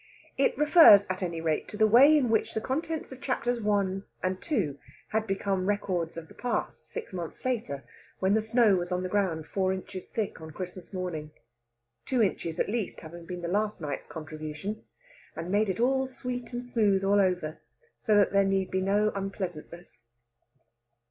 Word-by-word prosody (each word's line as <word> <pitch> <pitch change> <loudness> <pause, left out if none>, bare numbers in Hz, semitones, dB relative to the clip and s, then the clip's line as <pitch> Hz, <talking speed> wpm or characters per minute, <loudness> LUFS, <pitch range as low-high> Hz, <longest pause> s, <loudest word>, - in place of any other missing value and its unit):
It - - +2
refers, 300 - +8
at 185 - -4
any 170 -3 -3
rate, 160 -2 0
to 210 - -8
the 220 - +5
way 265 +8 +7
in 250 -6 +1
which 220 - +1
the - - +1
contents 315 +7 -3
of 260 0 -10
Chapters 245 -2 -1
I. 200 -2 +1 0.2
and 185 - -3
II. 155 - 0 0.3
had 220 0 -1
become 195 -1 -1
records 180 -5 -1
of 165 -1 -7
the - - -15
past 245 -1 -3
six 465 - -7
months 175 +3 -6
later, 220 - -2 0.3
when 190 +1 +2
the 220 - +3
snow 220 -2 +4
was 175 0 -3
on 180 0 0
the 185 - -3
ground 180 -6 0
four 190 +2 0
inches 185 0 -6
thick 215 -7 -3
on 160 - -8
Christmas 180 +1 -7
morning 180 -5 -4 0.7
two 255 -4 +2
inches, 170 -4 -2
at - - +2
least, 220 -1 -3
having 170 +1 -10
been 180 0 -6
last 210 +5 0
night's 150 -3 -5
contribution 155 +6 -6 0.5
and 165 +2 -5
made 210 +1 +2
it 190 - -2
all 265 +2 +2
sweet 250 -1 -6
and 245 0 -4
smooth 210 -5 +2
all 200 +1 +4
over 180 -5 -1 0.4
so 215 - +2
that 205 -2 +4
there 200 0 +4
need 195 -1 0
be 190 - 0
no 205 +2 +2
unpleasantness. 175 -7 -6
195 Hz, 180 wpm, -28 LUFS, 175-220 Hz, 0.7 s, refers